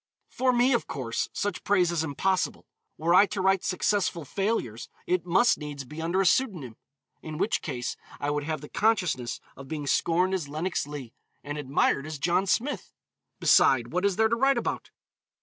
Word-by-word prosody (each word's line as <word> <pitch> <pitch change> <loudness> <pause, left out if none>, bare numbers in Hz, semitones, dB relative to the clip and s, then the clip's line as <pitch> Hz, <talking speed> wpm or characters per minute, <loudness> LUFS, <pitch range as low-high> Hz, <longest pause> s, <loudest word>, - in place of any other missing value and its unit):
For 255 0 +2
me, 245 +2 +3
of 235 - 0
course, 120 -4 -3
such 205 -3 -3
praise 185 -4 +3
is 165 -2 0
impossible. 180 +5 -1 0.3
Were 165 +2 +1
I 200 +3 +7
to 205 - -4
write 190 0 +2
successful 185 -3 0
failures, 195 - -2 0.2
it 180 -1 0
must 235 +8 +4
needs 145 -2 -6
be 150 +5 -8
under 170 +3 0
a - - +1
pseudonym. 175 - +1 0.5
In 155 -1 -7
which 195 +6 0
case 125 -7 -4 0.2
I 145 0 -1
would 145 0 -1
have 155 -1 -3
the 150 - -9
consciousness 180 - 0 0.2
of 135 0 -11
being 150 0 -4
scorned 175 +6 +2
as 170 -7 -2
Lenox 160 +1 -2
Leigh, 140 -6 -8 0.3
and 145 0 -5
admired 140 +1 +1
as 155 -1 -5
John 175 +6 +1
Smith. 260 +9 -1 0.4
Beside, 120 -3 +4
what 180 +2 0
is 200 -2 +2
there 220 +2 +4
to 235 - +2
write 270 +2 +3
about? - - -3
170 Hz, 185 wpm, -27 LUFS, 145-195 Hz, 0.5 s, I